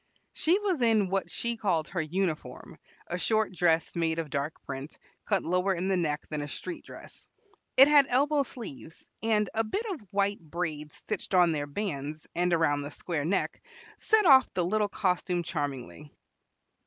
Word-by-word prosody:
She 340 +4 +2
was 390 -8 -1
in 220 -5 +3
what 195 0 0
she 235 0 -3
called 180 -8 0
her 175 -2 -1
uniform, 165 0 -3 0.3
a 175 - -4
short 215 -1 +1
dress 165 -2 +2
made 165 -1 0
of 160 -3 -4
dark 140 +2 -2
print, 135 +3 -7 0.3
cut 200 -4 +1
lower 180 +3 +1
in 180 +2 -2
the 195 - +2
neck 150 -4 -1
than 150 -1 -2
a 145 - -4
street 330 - -6
dress. - - -12 0.5
It 270 +2 +10
had 290 -2 +6
elbow 285 +3 +3
sleeves, 205 - -8
and 215 -2 +2
a 225 - +1
bit 400 - -3
of 350 - -4
white 200 +1 0
braid 155 -2 -4
stitched 205 +1 -4
on 175 -2 +5
their 145 -2 -2
bands 150 -3 -4
and 180 +1 +1
around 160 -4 +2
the 145 - -5
square 150 -1 -3
neck 185 +5 -1 0.4
set 435 -2 +3
off 265 -5 +7
the 180 -2 +1
little 210 +3 +1
costume 180 -3 0
charmingly. 145 -3 -5
180 Hz, 175 wpm, -29 LUFS, 155-220 Hz, 0.5 s, It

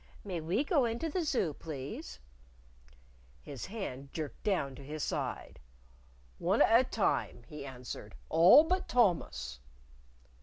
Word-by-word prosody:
"May 180 -5 -4
we 180 - 0
go 285 -3 +2
into 235 +8 -2
the 355 +4 -1
Zoo, 245 - 0
please?" 135 - -7 1.2
His 130 - -8
hand 140 - -6
jerked 155 -3 -5
down 180 -10 0
to 130 - -11
his 150 +2 -5
side. - - -3 0.8
"One 190 +6 +3
at 230 +2 +6
a - - 0
time," 185 - 0
he 150 -2 -8
answered; 125 - -8
" - - -30
all 185 - +8
but 370 +3 0
Thomas." 175 - +1
170 Hz, 140 wpm, -32 LUFS, 140-230 Hz, 1.2 s, all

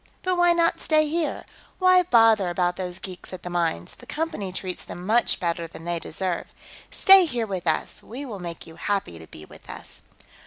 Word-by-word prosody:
But 370 -1 +1
why 350 0 +4
not 335 -1 +2
stay 310 -1 +3
here? 320 +1 -2 0.3
Why 370 -1 +5
bother 225 - +4
about 175 0 0
those 180 -1 -4
geeks 185 -1 -8
at 185 - -8
the 180 - -6
mines; 165 - -1
the - - -16
Company 300 - -3
treats 185 0 -5
them 175 - -8
much 230 +4 +2
better 170 -1 -2
than 165 0 -12
they 170 -1 -1
deserve. 180 +2 -3 0.4
Stay 385 -2 +7
here 245 -7 -2
with 185 -4 -5
us; 160 - -1
we 260 +6 -8
will 215 -7 -7
make 170 -2 -7
you 165 0 -13
happy 195 - -2
to 80 - -12
be 75 - -12
with - - -16
us." - - -8
190 Hz, 200 wpm, -24 LUFS, -, 0.4 s, Stay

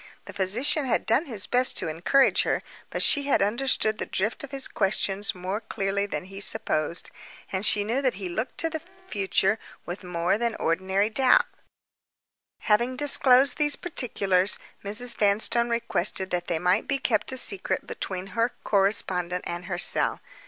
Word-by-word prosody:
The - - -10
physician 240 - +1
had 250 - 0
done 265 +9 +1
his 215 -7 -2
best 250 +1 0
to 185 - -1
encourage 175 - +2
her; - - -1 0.3
but - - +1
she 285 -1 +3
had 275 - +2
understood 220 0 0
the - - -3
drift 210 +8 -2
of 280 - -7
his 270 0 0
questions 195 0 0
more 185 +4 -4
clearly 200 -2 -2
than 195 - -4
he 195 +1 -9
supposed, 155 -3 -1 0.4
and 190 0 -2
she 210 -1 +3
knew 235 +6 -1
that 255 -6 0
he 190 -1 -6
looked 215 +8 -4
to 330 - -1
the 320 - -4 0.3
future 200 - +1 0.3
with 175 +3 -7
more 180 +2 -1
than 235 -2 -1
ordinary 190 +5 0
doubt. 255 +2 +4 1.2
Having 235 +4 +1
disclosed 265 -1 +4
these 295 -1 +3
particulars, 200 - 0 0.3
Mrs. 230 +4 +2
Vanstone 220 +3 +3
requested 195 -5 0
that 175 -1 -2
they 170 - -1
might 180 +5 +1
be 280 - 0
kept 225 -5 0
a 260 - -4
secret 380 +9 +1
between 185 -1 -5
her 230 +3 0
correspondent 185 -3 +1
and 175 +1 -5
herself. 175 -2 +3
210 Hz, 165 wpm, -25 LUFS, 190-250 Hz, 1.2 s, doubt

